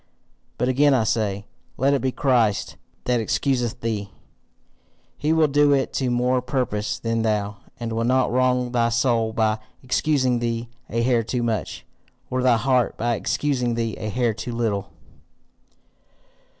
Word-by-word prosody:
But 125 - 0
again 140 +2 +4
I 120 - +2
say, 105 -2 -1 0.3
let 135 +3 +3
it 140 - +1
be 130 - 0
Christ 120 -8 +1 0.3
that 125 -1 +1
excuseth 120 +1 -1
thee; 105 -3 -2 1.1
he 150 +2 -1
will 160 -1 +4
do 145 0 +4
it 135 -1 0
to 130 -2 0
more 125 +1 +1
purpose 120 -5 -2
than 115 0 -1
thou, 105 -2 -1 0.2
and 115 -1 -4
will 115 +1 0
not 130 +2 +2
wrong 125 0 +1
thy 120 -1 +2
soul 115 -1 +1
by 110 -1 +1 0.2
excusing 130 -2 +1
thee 115 0 -2 0.2
a 115 +1 0
hair 120 -1 +3
too 120 +2 -2
much, 115 -3 -3 0.5
or 130 0 0
thy 125 -2 +4
heart 125 +1 +1
by 120 +1 0
excusing 125 0 -1
thee 115 -2 -2
a 110 - -3
hair 120 +1 +1
too 110 +3 -6
little. 110 -4 -1
120 Hz, 155 wpm, -23 LUFS, 115-130 Hz, 1.1 s, again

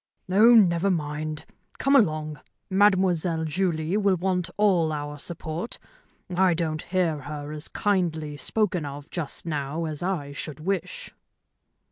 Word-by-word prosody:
"Oh, 225 +5 +7
never 185 -3 +4
mind. 155 -2 -3 0.3
Come 275 +2 +3
along. 155 - +2 0.3
Mademoiselle 185 -4 +3
Julie 165 0 -1
will 200 -2 +3
want 180 -1 -1
all 185 -6 +3
our 145 -1 -5
support. 165 +5 -5 0.6
I 185 -1 +4
don't 155 -2 -2
hear 175 -4 0
her 145 +1 -6
as 150 0 -2
kindly 165 -7 -1
spoken 185 +2 0
of 145 0 -8
just 165 -2 -3
now 150 0 -2
as 155 -2 -4
I 175 -6 -2
should 145 +1 -6
wish." 200 - -3
165 Hz, 130 wpm, -26 LUFS, 155-190 Hz, 0.6 s, Oh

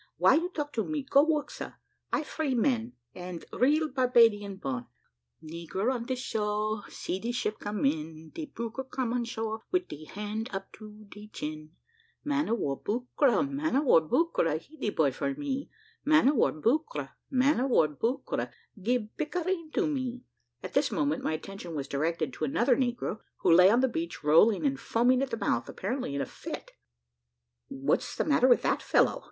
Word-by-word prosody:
Why - - +6
you 340 +3 +2
talk 295 -5 -4
to 225 - 0
me? 305 +1 -3
Go, 275 +1 +5
work, 305 -2 0
sar. - - -8 0.3
I 310 - +1
free 300 -3 -2
man, 240 -1 +1 0.2
and 180 -1 -7
real 300 +5 +3
Barbadian 235 -7 +3
born. 130 -8 -4 0.6
"Negro 170 +9 -2
on 240 -2 -4
de 260 - 0
shore 215 -3 -2
See 185 - -4
de 230 +4 -2
ship 230 -3 -2
come 205 -4 -2
in, 155 +2 -2
De 320 -2 -5
buccra 235 +1 -6
come 250 -3 -2
on 245 -1 0
shore, 225 -2 -4
Wid 365 0 +1
de 155 +1 -8
hand 210 +5 -4
up 195 0 -6
to 215 0 -12
de 210 +1 -11
chin; 155 -4 -6 0.5
Man 295 0 0
of 230 - +2
war, 140 -9 -2
buccra, 250 +2 +1
Man 280 +2 -1
of 280 - +3
war, 240 - +6
buccra, 165 - +1
He 295 - -18
de 220 - -2
boy 155 -8 +2
for 275 - -2
me, 280 -1 -3 0.3
Man 310 -2 +5
of 295 - +2
war, - - +3
buccra, 295 - -1 0.2
Man 265 +1 +3
of 265 +2 +1
war, 160 -10 +5
buccra, 150 - -2 0.3
Gib 225 +1 -1
pictareen 335 +1 -2
to 405 - +2
me." 260 -4 -2 0.4
At - - -6
this - - +2
moment 290 -3 0
my 160 - 0
attention 175 +1 -6
was 140 -2 -3
directed 155 0 -1
to - - -6
another 235 - +3
negro, 245 -4 -1 0.2
who - - +4
lay 180 +2 +8
on 235 +4 +4
the 265 - +4
beach, 330 - -4
rolling 190 - +5
and 275 -1 +1
foaming 250 +3 +2
at 275 - -1
the 230 - -3
mouth, 120 - 0
apparently 230 - -3
in 140 - -1
a - - -1
fit. - - -8 1.0
"What's 135 0 -1
the - - 0
matter 285 -4 +4
with 245 - +5
that - - +1
fellow?" - - +3
235 Hz, 190 wpm, -29 LUFS, 185-275 Hz, 1.0 s, lay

